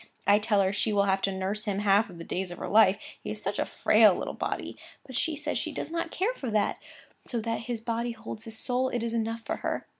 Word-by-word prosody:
I 205 Hz, +1 st, +6 dB
tell 210 Hz, -1 st, +2 dB
her 190 Hz, +1 st, +1 dB
she 215 Hz, +1 st, +1 dB
will 200 Hz, -1 st, +3 dB
have 195 Hz, -1 st, +2 dB
to 195 Hz, -, +1 dB
nurse 195 Hz, +3 st, -2 dB
him 205 Hz, -2 st, -1 dB
half 205 Hz, +1 st, +4 dB
the 170 Hz, -3 st, -9 dB
days 185 Hz, +2 st, -3 dB
of 175 Hz, -, -7 dB
her -, -, -5 dB
life, 205 Hz, -2 st, +6 dB, 0.3 s
he -, -, -5 dB
is 215 Hz, -, -3 dB
such 205 Hz, -1 st, -2 dB
a -, -, +2 dB
frail 215 Hz, -3 st, +5 dB
little -, -, -4 dB
body. -, -, -3 dB, 0.3 s
But 260 Hz, -, -9 dB
she 320 Hz, +5 st, 0 dB
says 300 Hz, +1 st, -1 dB
she -, -, -2 dB
does -, -, -4 dB
not 335 Hz, 0 st, -2 dB
care 395 Hz, +9 st, 0 dB
for 265 Hz, -, -5 dB
that; 210 Hz, -2 st, +1 dB, 0.5 s
so 240 Hz, -, -1 dB
that 230 Hz, +1 st, -2 dB
his 235 Hz, -2 st, -2 dB
body 235 Hz, +1 st, -2 dB
holds 220 Hz, 0 st, -8 dB
his 220 Hz, -1 st, -5 dB
soul, 255 Hz, +2 st, 0 dB
it 240 Hz, -2 st, -2 dB
is 230 Hz, 0 st, -2 dB
enough 230 Hz, 0 st, -2 dB
for -, -, -2 dB
her. -, -, -3 dB
220 Hz, 260 wpm, -28 LUFS, 200-235 Hz, 0.5 s, I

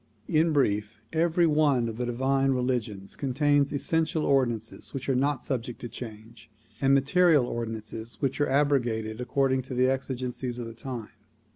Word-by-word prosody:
In 160 Hz, +1 st, +3 dB
brief; 105 Hz, -7 st, +1 dB, 0.2 s
every 170 Hz, +1 st, +3 dB
one 150 Hz, -6 st, +3 dB
of 115 Hz, -1 st, -5 dB
the 125 Hz, 0 st, -2 dB
divine 135 Hz, +2 st, +1 dB
religions 120 Hz, -6 st, -2 dB
contains 145 Hz, +1 st, +2 dB
essential 160 Hz, +2 st, 0 dB
ordinances 120 Hz, -3 st, 0 dB
which 135 Hz, -, -4 dB
are 135 Hz, -, +2 dB
not 140 Hz, +1 st, +1 dB
subject 125 Hz, -3 st, -3 dB
to 120 Hz, -, -4 dB
change, 110 Hz, -1 st, -10 dB, 0.3 s
and 135 Hz, 0 st, +5 dB
material 150 Hz, 0 st, +4 dB
ordinances 115 Hz, -1 st, -5 dB
which 135 Hz, +1 st, -1 dB
are 145 Hz, -, +2 dB
abrogated 120 Hz, -6 st, +1 dB
according 130 Hz, +1 st, +1 dB
to 130 Hz, 0 st, -7 dB
the 130 Hz, +1 st, +3 dB
exigencies 130 Hz, -2 st, -3 dB
of 115 Hz, -2 st, -6 dB
time. 120 Hz, -2 st, -6 dB
130 Hz, 150 wpm, -27 LUFS, 115-140 Hz, 0.3 s, and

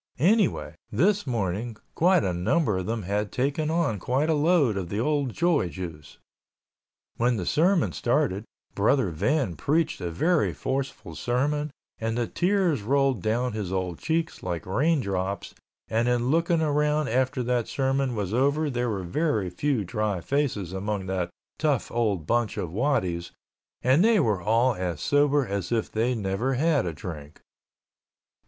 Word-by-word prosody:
Anyway, 195 Hz, -, +2 dB, 0.2 s
this 195 Hz, -, +2 dB
morning 110 Hz, 0 st, -2 dB, 0.2 s
quite 180 Hz, +1 st, +4 dB
a 90 Hz, -, 0 dB
number 105 Hz, -, +1 dB
of 95 Hz, -, -5 dB
them 115 Hz, -1 st, -2 dB
had 100 Hz, +3 st, -2 dB
taken 145 Hz, +4 st, 0 dB
on 160 Hz, -, 0 dB
quite 135 Hz, -, +1 dB
a -, -, +4 dB
load 150 Hz, -, +3 dB
of 95 Hz, -3 st, -3 dB
the 100 Hz, -, -2 dB
old 145 Hz, 0 st, 0 dB
joy 170 Hz, -, +1 dB
juice. 80 Hz, -3 st, -8 dB, 1.0 s
When 120 Hz, 0 st, +2 dB
the 90 Hz, -, -3 dB
sermon 175 Hz, -, +2 dB
started, 120 Hz, -6 st, 0 dB, 0.3 s
Brother 110 Hz, 0 st, +2 dB
Van 125 Hz, -, 0 dB
preached 150 Hz, -, 0 dB
a 90 Hz, -, -2 dB
very 160 Hz, -, +1 dB
forceful 130 Hz, -10 st, -4 dB
sermon 140 Hz, -, -1 dB, 0.3 s
and 115 Hz, +1 st, -2 dB
the 120 Hz, -, +1 dB
tears 180 Hz, -, +1 dB
rolled 135 Hz, 0 st, +1 dB
down 120 Hz, +3 st, 0 dB
his 105 Hz, -4 st, -4 dB
old 90 Hz, -3 st, -2 dB
cheeks 165 Hz, 0 st, -1 dB
like 85 Hz, -3 st, -4 dB
rain 145 Hz, -, +2 dB
drops 95 Hz, -1 st, -3 dB, 0.3 s
and 115 Hz, +2 st, +1 dB
in 125 Hz, +1 st, +1 dB
looking 165 Hz, +1 st, +2 dB
around 150 Hz, -1 st, +1 dB
after 130 Hz, +1 st, +1 dB
that 120 Hz, -1 st, 0 dB
sermon 135 Hz, -2 st, 0 dB
was 100 Hz, -2 st, -2 dB
over 140 Hz, +4 st, +2 dB
there 120 Hz, -1 st, -1 dB
were 100 Hz, -4 st, -2 dB
very 105 Hz, -, 0 dB
few 130 Hz, +4 st, 0 dB
dry 105 Hz, -1 st, -1 dB
faces 115 Hz, -, -1 dB
among 100 Hz, 0 st, -3 dB
that 95 Hz, -2 st, -2 dB, 0.3 s
tough 150 Hz, -5 st, 0 dB
old 105 Hz, -9 st, 0 dB
bunch 120 Hz, +1 st, 0 dB
of 85 Hz, -, -3 dB
waddies 95 Hz, -9 st, 0 dB, 0.5 s
and 130 Hz, +8 st, +4 dB
they 225 Hz, -1 st, +5 dB
were 105 Hz, -, +1 dB
all 115 Hz, +6 st, +3 dB
as 90 Hz, -5 st, -3 dB
sober 145 Hz, -, +3 dB
as 100 Hz, -3 st, -3 dB
if 115 Hz, -2 st, 0 dB
they 120 Hz, +3 st, +1 dB
never 110 Hz, +5 st, -1 dB
had 150 Hz, -, +2 dB
a -, -, -1 dB
drink. 75 Hz, -2 st, -8 dB
120 Hz, 160 wpm, -26 LUFS, 95-145 Hz, 1.0 s, they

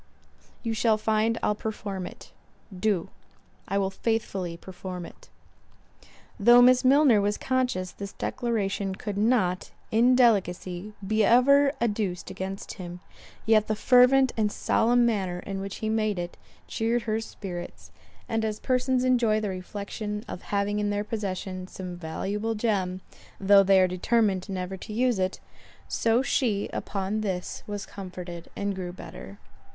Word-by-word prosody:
You 230 Hz, -2 st, -1 dB
shall 220 Hz, 0 st, +2 dB
find 220 Hz, +1 st, +1 dB
I'll 210 Hz, -, +3 dB
perform 205 Hz, -3 st, -5 dB
it.—Do. 190 Hz, -1 st, -5 dB, 0.6 s
I 195 Hz, -, 0 dB
will 195 Hz, -1 st, 0 dB
faithfully 190 Hz, -5 st, -2 dB
perform 180 Hz, 0 st, -7 dB
it." -, -, -14 dB, 1.1 s
Though 240 Hz, +4 st, +7 dB
Miss 250 Hz, +1 st, +6 dB
Milner 265 Hz, -4 st, +5 dB
was 205 Hz, +1 st, 0 dB
conscious 250 Hz, -9 st, -1 dB
this 200 Hz, -1 st, -8 dB
declaration 200 Hz, -4 st, -2 dB
could 205 Hz, +1 st, -5 dB
not, 205 Hz, -4 st, +1 dB, 0.2 s
in 240 Hz, +3 st, +5 dB
delicacy, 195 Hz, -4 st, +1 dB
be 215 Hz, +2 st, +2 dB
ever 275 Hz, +5 st, +5 dB
adduced 205 Hz, -6 st, -1 dB
against 190 Hz, +1 st, -6 dB
him; 175 Hz, 0 st, -7 dB, 0.5 s
yet 220 Hz, -1 st, +4 dB
the 215 Hz, -, 0 dB
fervent 255 Hz, +3 st, +5 dB
and 215 Hz, -2 st, +1 dB
solemn 240 Hz, +3 st, +2 dB
manner 195 Hz, -6 st, 0 dB
in 195 Hz, -1 st, -5 dB
which 195 Hz, 0 st, -5 dB
he -, -, 0 dB
made 215 Hz, -2 st, 0 dB
it, 175 Hz, 0 st, -4 dB, 0.3 s
cheered 230 Hz, +1 st, 0 dB
her 220 Hz, 0 st, -1 dB
spirits; 180 Hz, -5 st, -8 dB, 0.4 s
and 225 Hz, -1 st, -1 dB
as 215 Hz, -1 st, -2 dB
persons 255 Hz, 0 st, +1 dB
enjoy 240 Hz, -4 st, +3 dB
the 210 Hz, -2 st, -2 dB
reflection 205 Hz, +3 st, -5 dB
of -, -, -7 dB
having 205 Hz, +1 st, 0 dB
in 205 Hz, 0 st, 0 dB
their 205 Hz, 0 st, -1 dB
possession 190 Hz, -3 st, -4 dB
some 185 Hz, -1 st, -7 dB
valuable 200 Hz, +7 st, -3 dB
gem, 195 Hz, -4 st, -1 dB, 0.4 s
though 200 Hz, 0 st, +6 dB
they 195 Hz, 0 st, +5 dB
are 185 Hz, -, +5 dB
determined 190 Hz, +1 st, +1 dB
never 190 Hz, 0 st, -4 dB
to 210 Hz, +3 st, -8 dB
use 245 Hz, -2 st, +1 dB
it, 185 Hz, 0 st, -1 dB, 0.5 s
so 230 Hz, +3 st, +2 dB
she 230 Hz, -6 st, 0 dB
upon 200 Hz, +2 st, -2 dB
this, 185 Hz, -4 st, -3 dB
was 205 Hz, -1 st, -4 dB
comforted 180 Hz, -3 st, -8 dB
and 200 Hz, 0 st, -2 dB
grew 185 Hz, -2 st, -5 dB
better. 100 Hz, -, -10 dB
205 Hz, 145 wpm, -27 LUFS, 190-225 Hz, 1.1 s, Though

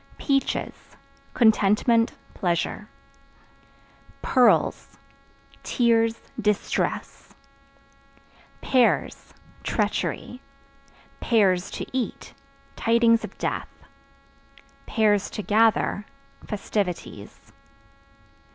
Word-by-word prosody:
Peaches 275 Hz, -2 st, -1 dB, 0.6 s
Contentment, 230 Hz, +1 st, +3 dB, 0.2 s
pleasure. 180 Hz, +3 st, -2 dB, 1.3 s
Pearls 250 Hz, -2 st, +2 dB, 0.6 s
Tears, 230 Hz, -1 st, +1 dB, 0.2 s
distress. 210 Hz, -1 st, -2 dB, 1.3 s
Pears 255 Hz, -3 st, +1 dB, 0.3 s
Treachery; 250 Hz, +2 st, -2 dB, 0.8 s
(to 195 Hz, -5 st, +1 dB
eat) 255 Hz, -2 st, -4 dB, 0.4 s
tidings 230 Hz, 0 st, +3 dB
of -, -, -8 dB
death; -, -, -3 dB, 1.2 s
(to 210 Hz, -1 st, +1 dB
gather) 215 Hz, -1 st, +2 dB, 0.4 s
festivities. 185 Hz, -, -5 dB
225 Hz, 50 wpm, -24 LUFS, 205-235 Hz, 1.3 s, Contentment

